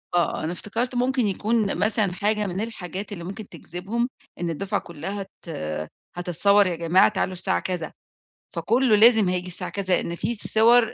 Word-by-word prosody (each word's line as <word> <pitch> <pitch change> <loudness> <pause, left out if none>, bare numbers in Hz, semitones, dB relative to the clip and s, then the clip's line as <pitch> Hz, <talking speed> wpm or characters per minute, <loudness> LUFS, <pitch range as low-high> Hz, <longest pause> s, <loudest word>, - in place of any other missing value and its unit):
آه 170 -3 +1
أنا 160 - -2
افتكرت 225 +8 -3
ممكن 250 -1 +1
يكون 210 +1 0
مثلًا 210 -2 +2
حاجة 210 +2 0
من 185 +1 -3
الحاجات 200 -3 -5
اللي 175 -4 -6
ممكن 200 +4 -7
تجذبهم، 195 +9 -3 0.3
إن 175 - -2
الدفعة 195 +6 -2
كلّها 195 +5 -6 0.2
ت - - -9 0.7
هتتصور، 195 +3 +3
يا 175 - -1
جماعة 170 +3 +4
تعالوا 185 - -1
الساعة 185 +1 0
كذا، 175 -4 -4 0.6
فكلّه 225 +7 +3
لازم 220 -2 +6
هييجي 180 0 -2
الساعة 180 0 0
كذا 190 -2 +1
لإن 170 - -4
في 215 +7 -2
صور 230 +2 +4
200 Hz, 165 wpm, -24 LUFS, 180-220 Hz, 0.7 s, لازم